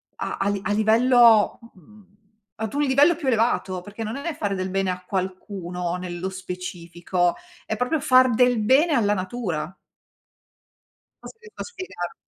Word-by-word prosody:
a -, -, -4 dB
a 195 Hz, -, -1 dB
li 200 Hz, -1 st, -1 dB
a 210 Hz, -, -2 dB
livello 225 Hz, +1 st, +4 dB
mhmm, 200 Hz, +3 st, -19 dB, 0.5 s
ad 220 Hz, +1 st, -5 dB
un 290 Hz, -, 0 dB
livello 285 Hz, +5 st, +4 dB
più 300 Hz, -3 st, -6 dB
elevato, 225 Hz, -6 st, +1 dB
perché 205 Hz, +4 st, -8 dB
non 220 Hz, +1 st, -4 dB
è 290 Hz, +4 st, -4 dB
fare 205 Hz, -8 st, -2 dB
del 185 Hz, 0 st, -3 dB
bene 195 Hz, 0 st, -1 dB
a 180 Hz, 0 st, -7 dB
qualcuno 185 Hz, -2 st, -4 dB
nello 180 Hz, +1 st, -5 dB
specifico, 180 Hz, -1 st, -3 dB, 0.3 s
è 220 Hz, -, -2 dB
proprio 250 Hz, +7 st, -1 dB
far 255 Hz, -2 st, +5 dB
del 245 Hz, 0 st, +3 dB
bene 285 Hz, +9 st, +4 dB
alla 205 Hz, -5 st, +2 dB
natura. 185 Hz, -4 st, -4 dB, 1.5 s
Cosa 450 Hz, -, -11 dB
devi 440 Hz, -2 st, -16 dB
fa -, -, -5 dB
spiegare? 370 Hz, -, -7 dB
205 Hz, 155 wpm, -23 LUFS, 185-250 Hz, 1.5 s, far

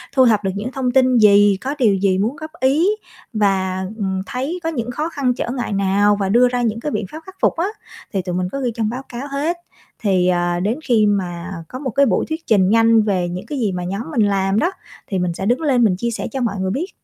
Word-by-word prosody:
thu 260 Hz, -1 st, +6 dB
thập 215 Hz, -3 st, +3 dB
được 190 Hz, -, 0 dB
những 215 Hz, +6 st, -4 dB
thông 260 Hz, -2 st, -1 dB
tin 255 Hz, -1 st, +4 dB
gì, 205 Hz, -2 st, +6 dB
có 275 Hz, +3 st, -3 dB
điều 215 Hz, -6 st, +4 dB
gì 190 Hz, -1 st, +1 dB
muốn 225 Hz, +8 st, 0 dB
góp 310 Hz, +2 st, -8 dB
ý, 280 Hz, +7 st, +3 dB, 0.5 s
và, 190 Hz, -3 st, 0 dB
ừm, 190 Hz, -3 st, -2 dB
thấy 270 Hz, -, -3 dB
có 325 Hz, -, 0 dB
những 245 Hz, -6 st, -3 dB
khó 305 Hz, +6 st, -2 dB
khăn, 270 Hz, -6 st, 0 dB
trở 240 Hz, -, -4 dB
ngại 245 Hz, -4 st, -3 dB
nào, 200 Hz, +1 st, +2 dB
và 195 Hz, -1 st, 0 dB
đưa 240 Hz, +5 st, +5 dB
ra 245 Hz, 0 st, -1 dB
những 225 Hz, -2 st, -1 dB
cái 295 Hz, -, -3 dB
biện 215 Hz, -, -2 dB
pháp 315 Hz, -, -7 dB
khắc 380 Hz, 0 st, -12 dB
phục -, -, +2 dB
á. 345 Hz, +4 st, +1 dB, 0.5 s
Thì 195 Hz, -, 0 dB
tụi 180 Hz, -1 st, -4 dB
mình 180 Hz, 0 st, -1 dB
có 275 Hz, -, -3 dB
ghi 245 Hz, -2 st, 0 dB
trong 220 Hz, -2 st, -1 dB
báo 255 Hz, +4 st, -5 dB
cáo 255 Hz, +4 st, -6 dB
hết. 305 Hz, +5 st, -1 dB, 0.5 s
Thì, 185 Hz, -3 st, +2 dB
ờ, 175 Hz, -1 st, +1 dB
đến 215 Hz, +9 st, -1 dB
khi 225 Hz, -4 st, +3 dB
mà 185 Hz, -3 st, -2 dB
có 255 Hz, -, -7 dB
một 270 Hz, -2 st, -3 dB
cái 275 Hz, +4 st, +3 dB
buổi -, -, +1 dB
thuyết 320 Hz, +1 st, -5 dB
trình 195 Hz, -3 st, +4 dB
nhanh 225 Hz, 0 st, +5 dB
về 185 Hz, -4 st, 0 dB
những 180 Hz, +3 st, -6 dB
cái 280 Hz, +3 st, -4 dB
gì 215 Hz, -5 st, 0 dB
mà 180 Hz, -1 st, -4 dB
nhóm 195 Hz, +4 st, -3 dB
mình 245 Hz, -, +1 dB
làm 195 Hz, +1 st, +1 dB
đó, 345 Hz, +8 st, +1 dB, 0.4 s
thì 190 Hz, -2 st, -2 dB
mình 175 Hz, -1 st, -1 dB
sẽ 190 Hz, -, -5 dB
đứng 245 Hz, +8 st, +1 dB
lên 260 Hz, -6 st, +2 dB
mình 195 Hz, -5 st, +3 dB
chia 235 Hz, +3 st, -2 dB
sẻ -, -, -4 dB
cho 265 Hz, -, -3 dB
mọi 220 Hz, -4 st, -1 dB
người 190 Hz, 0 st, -1 dB
biết. 320 Hz, -, -2 dB
220 Hz, 265 wpm, -19 LUFS, 195-260 Hz, 0.5 s, thu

